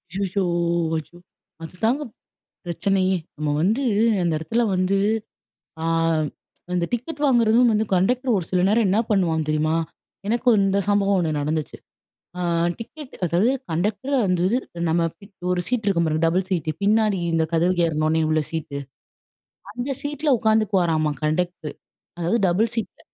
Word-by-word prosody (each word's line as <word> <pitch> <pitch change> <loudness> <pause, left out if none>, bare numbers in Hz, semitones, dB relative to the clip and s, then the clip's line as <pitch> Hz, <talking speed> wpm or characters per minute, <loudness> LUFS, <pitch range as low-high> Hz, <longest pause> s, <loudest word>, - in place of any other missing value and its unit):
ஐயயோ! 195 +1 -1 0.5
ஐயோ! 160 +2 -8 0.5
அதுதாங்க 225 - -1 0.6
பிரச்சனையே. 190 +2 +1 0.2
நம்ம 150 0 -2
வந்து 220 +10 +1 0.4
அந்த 170 -2 +1
இடத்துல 225 +10 0
வந்து, 185 +2 +1 0.9
ஆ. - - -1 0.9
அந்த 175 -1 +1
டிக்கெட் 250 +6 -3
வாங்குறதும் 240 -2 +4
வந்து 215 0 +2
கண்டெக்டர் 245 +7 +2
ஒரு 185 - -1
சில 180 - +2
நேரம் 220 +1 +3
என்ன 195 +3 +2
பண்ணுவான் 170 -6 +2
தெரியுமா? 155 +1 +1 0.5
எனக்கு 240 +4 +2
இந்த 195 0 +2
சம்பவம் 200 -1 +3
ஒன்னு 160 -3 0
நடந்துச்சு. 155 +1 -2 0.6
ஆ - - -3 0.4
டிக்கெட் 275 +4 -9
அதாவது 180 +7 +2 0.2
கண்டெக்டர் 205 - -1
வந்து 180 -2 +1
இது 240 +5 +2 0.3
நம்ம 165 +1 +2 0.5
ஒரு 180 - 0
சீட் 245 -4 -1
இருக்கும் 170 -4 +2
பாருங்க. 155 0 0
டபுள் 180 +3 +1
சீட்டு 160 -4 -1
பின்னாடி 210 -1 +3
இந்த 165 -1 +2
கதவுக்கு 175 +1 +2
ஏறுன 155 -1 0
உன்னே 160 +1 +2
உள்ள 155 0 +2
சீட்டு. 155 -3 -4 0.9
அந்த 245 +5 -3
சீட்ல 295 +1 -1
உட்கார்ந்துக்குவாராமா 195 -8 +2
கண்டக்ட்ரு. 160 0 -1 0.5
அதாவது 175 +8 +1
டபுள் 210 +6 +1
சீட்ல. 225 -3 -4
190 Hz, 135 wpm, -23 LUFS, 165-220 Hz, 0.9 s, வாங்குறதும்